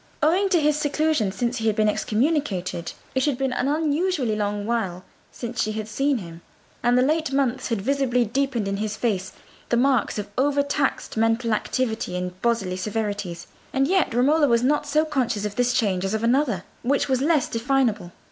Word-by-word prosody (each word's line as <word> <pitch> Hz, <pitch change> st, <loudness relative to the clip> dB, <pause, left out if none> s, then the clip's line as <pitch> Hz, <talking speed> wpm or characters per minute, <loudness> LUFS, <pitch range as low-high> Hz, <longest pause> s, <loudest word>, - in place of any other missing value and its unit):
Owing 365 Hz, +6 st, +3 dB
to 360 Hz, -3 st, +3 dB
his 300 Hz, -1 st, +2 dB
seclusion 300 Hz, -7 st, +1 dB
since 240 Hz, +5 st, -2 dB
he 225 Hz, -, -1 dB
had 215 Hz, -, +2 dB
been 215 Hz, 0 st, +2 dB
excommunicated, 210 Hz, -, -1 dB, 0.2 s
it 260 Hz, 0 st, +1 dB
had 290 Hz, -4 st, 0 dB
been 265 Hz, -1 st, -1 dB
an 255 Hz, -, 0 dB
unusually 300 Hz, -, 0 dB
long 205 Hz, -1 st, -2 dB
while 200 Hz, -6 st, -2 dB, 0.3 s
since 240 Hz, 0 st, -4 dB
she 215 Hz, -, -1 dB
had 215 Hz, -1 st, -4 dB
seen 275 Hz, +4 st, +1 dB
him, 170 Hz, -5 st, -9 dB, 0.4 s
and 240 Hz, +1 st, +3 dB
the 250 Hz, -, +4 dB
late 310 Hz, +1 st, +1 dB
months 265 Hz, -2 st, 0 dB
had 225 Hz, -5 st, -2 dB
visibly 255 Hz, -1 st, +1 dB
deepened 245 Hz, -2 st, -1 dB
in 195 Hz, 0 st, -1 dB
his 215 Hz, +1 st, -3 dB
face 195 Hz, -6 st, -1 dB, 0.4 s
the 240 Hz, -, +2 dB
marks 260 Hz, -1 st, +2 dB
of 210 Hz, -1 st, -3 dB
over 285 Hz, +1 st, +2 dB
taxed 280 Hz, -4 st, -1 dB
mental 225 Hz, +1 st, +2 dB
activity 220 Hz, -4 st, -1 dB
and 180 Hz, +1 st, -5 dB
bodily 205 Hz, -6 st, 0 dB
severities; 205 Hz, -3 st, -3 dB, 0.3 s
and 270 Hz, 0 st, +2 dB
yet 375 Hz, -3 st, +2 dB
Romola 290 Hz, +5 st, +4 dB
was 235 Hz, -1 st, +3 dB
not 295 Hz, +3 st, +1 dB
so 305 Hz, +2 st, +2 dB
conscious 245 Hz, -8 st, -1 dB
of 205 Hz, -1 st, -4 dB
this 245 Hz, +1 st, +2 dB
change 200 Hz, -7 st, +1 dB
as 195 Hz, +2 st, -1 dB
of 220 Hz, -, -2 dB
another, 235 Hz, -6 st, +2 dB, 0.2 s
which 270 Hz, +4 st, +1 dB
was 260 Hz, -2 st, +1 dB
less 300 Hz, -2 st, +2 dB
definable. 230 Hz, -6 st, 0 dB
240 Hz, 190 wpm, -24 LUFS, 210-280 Hz, 0.4 s, the